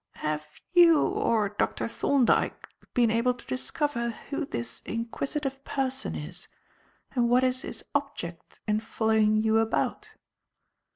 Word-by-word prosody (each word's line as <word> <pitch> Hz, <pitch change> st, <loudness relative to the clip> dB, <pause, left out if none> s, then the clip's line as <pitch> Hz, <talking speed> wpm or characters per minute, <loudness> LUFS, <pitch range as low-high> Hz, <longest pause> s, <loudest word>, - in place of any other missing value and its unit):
"Have 150 Hz, 0 st, -4 dB
you 340 Hz, -2 st, +8 dB
or 285 Hz, -, +1 dB
Dr. 205 Hz, -, -1 dB
Thorndyke 255 Hz, +1 st, +1 dB, 0.3 s
been 240 Hz, -3 st, +4 dB
able 235 Hz, +2 st, +2 dB
to -, -, -15 dB
discover 255 Hz, -2 st, -2 dB, 0.2 s
who 285 Hz, 0 st, -2 dB
this 120 Hz, -, -1 dB
inquisitive 270 Hz, +4 st, -3 dB
person 265 Hz, -, -2 dB
is 75 Hz, -1 st, -6 dB, 0.6 s
and 240 Hz, -2 st, +1 dB
what 250 Hz, +1 st, +4 dB
is 255 Hz, 0 st, +1 dB
his -, -, -6 dB
object 275 Hz, -, -4 dB
in 210 Hz, 0 st, +2 dB
following 220 Hz, -1 st, +2 dB
you 220 Hz, 0 st, +3 dB
about?" 225 Hz, 0 st, 0 dB
235 Hz, 125 wpm, -28 LUFS, 215-275 Hz, 0.6 s, you